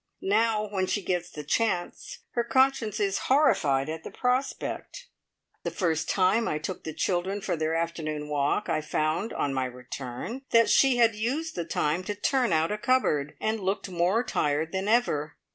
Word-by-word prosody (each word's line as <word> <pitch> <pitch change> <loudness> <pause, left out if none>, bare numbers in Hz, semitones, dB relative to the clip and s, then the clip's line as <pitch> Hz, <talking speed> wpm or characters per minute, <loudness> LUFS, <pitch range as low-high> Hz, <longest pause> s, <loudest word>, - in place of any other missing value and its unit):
Now, 215 0 +2
when 190 -2 -1
she 205 - -1
gets 180 -1 -1
the 150 - -8
chance, 180 +2 -1
her 240 - 0
conscience 260 -4 +2
is 200 -1 +1
horrified 145 - +3
at 160 +1 -5
the - - -6
prospect. 260 - -2 0.6
The - - -2
first 160 -4 -1
time 205 +5 +3
I 150 - 0
took 160 +4 -5
the 160 - -3
children 190 +2 0
for 200 - -2
their 160 0 -1
afternoon 155 -3 -3
walk 145 +7 0
I - - 0
found, 155 +7 -1
on 140 - -1
my 130 -1 0
return, 125 - -6
that 230 0 +5
she 270 -2 +5
had 230 -1 +5
used 270 +10 -2
the 170 - -3
time 165 +1 0
to 205 - -3
turn 250 +3 +1
out 160 +2 +2
a 210 - -2
cupboard, 155 - +1
and 220 +1 -1
looked 195 0 -2
more 180 +7 +2
tired 160 -7 0
than 190 +1 -2
ever. 210 -10 +1
185 Hz, 180 wpm, -27 LUFS, 155-230 Hz, 0.6 s, that